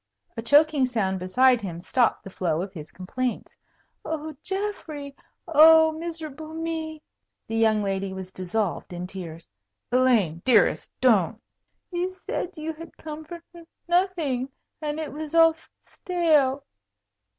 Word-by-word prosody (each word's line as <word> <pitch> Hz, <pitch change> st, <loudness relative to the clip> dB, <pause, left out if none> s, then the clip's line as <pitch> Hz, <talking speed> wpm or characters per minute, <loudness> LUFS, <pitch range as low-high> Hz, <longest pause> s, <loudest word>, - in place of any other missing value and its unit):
A 230 Hz, -, -4 dB
choking 290 Hz, +2 st, +4 dB
sound 195 Hz, -6 st, -1 dB
beside 245 Hz, +7 st, +3 dB
him 175 Hz, -4 st, -5 dB
stopped 235 Hz, +7 st, +1 dB
the 195 Hz, -, -9 dB
flow 170 Hz, -2 st, -1 dB
of 195 Hz, 0 st, -8 dB
his 155 Hz, -4 st, -9 dB
complaints. 245 Hz, +7 st, -4 dB, 0.5 s
"Oh, 310 Hz, -1 st, -4 dB
Geoffrey, 350 Hz, -8 st, -4 dB, 0.3 s
oh, 320 Hz, 0 st, +7 dB
miserable 315 Hz, -1 st, -7 dB
me!" 320 Hz, -1 st, -4 dB, 0.4 s
The 225 Hz, -, -4 dB
young 220 Hz, -2 st, +3 dB
lady 195 Hz, -1 st, -2 dB
was 190 Hz, -1 st, -7 dB
dissolved 185 Hz, 0 st, -3 dB
in 175 Hz, 0 st, -5 dB
tears. 170 Hz, -3 st, -8 dB, 0.4 s
"Elaine 235 Hz, -10 st, +3 dB
dearest 235 Hz, -5 st, +3 dB
don't." 225 Hz, -4 st, +3 dB, 0.5 s
"You 355 Hz, +1 st, -1 dB
said 370 Hz, -1 st, -5 dB
you 315 Hz, +1 st, -4 dB
had 330 Hz, +2 st, -12 dB
come 310 Hz, 0 st, -8 dB
for 340 Hz, +1 st, -9 dB
n 340 Hz, -1 st, -13 dB, 0.2 s
nothing, 340 Hz, -8 st, +1 dB, 0.3 s
and 300 Hz, 0 st, -3 dB
it 310 Hz, -3 st, -5 dB
was 310 Hz, +1 st, -5 dB
all 330 Hz, -1 st, +7 dB
st 320 Hz, -, -17 dB
stale." 305 Hz, -7 st, +1 dB
280 Hz, 140 wpm, -25 LUFS, 200-320 Hz, 0.5 s, oh